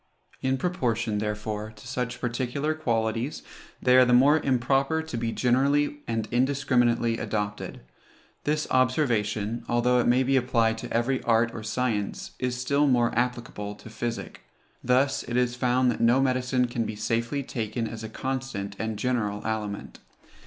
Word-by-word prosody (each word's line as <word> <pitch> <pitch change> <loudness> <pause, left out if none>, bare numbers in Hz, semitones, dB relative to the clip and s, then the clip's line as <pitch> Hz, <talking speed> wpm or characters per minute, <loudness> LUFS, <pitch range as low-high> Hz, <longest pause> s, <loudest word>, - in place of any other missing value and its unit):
In 130 0 +1
proportion, 120 - -1
therefore, 105 0 -3
to 110 - -13
such 125 -1 -3
particular 130 +5 -1
qualities, 115 -3 -1 0.4
they 125 0 +5
are 130 - +8
the 125 -1 +3
more 145 +5 +6
improper 135 +4 +1
to 160 -6 -6
be 115 0 -1
generally 140 +5 +2
and 115 -2 -1
indiscriminately 120 -3 +2
adopted. 105 -2 -3 0.6
This 150 +1 0
observation, 115 -4 +1
although 125 +1 +3
it 120 - +1
may 125 +2 +4
be 135 +1 +2
applied 115 -3 +2
to - - -7
every 120 +3 +1
art 115 0 +2
or 115 - -6
science, 110 -2 -2
is 125 -1 -1
still 140 +3 +2
more 120 -3 +3
applicable 120 -4 -2
to 110 - -13
physic. 115 +1 -5 0.4
Thus 130 +3 +2
is 125 0 0
it 125 - -11
found 125 0 +3
that - - -4
no 120 +3 +5
medicine 125 -1 +1
can 120 -1 -2
be 110 - -4
safely 115 +6 -1
taken 115 -2 -3
as 110 0 -7
a 110 - -5
constant 130 -6 -4
and 110 -1 -2
general 105 -3 -1
aliment. 105 -2 -4
120 Hz, 155 wpm, -26 LUFS, 115-130 Hz, 0.6 s, are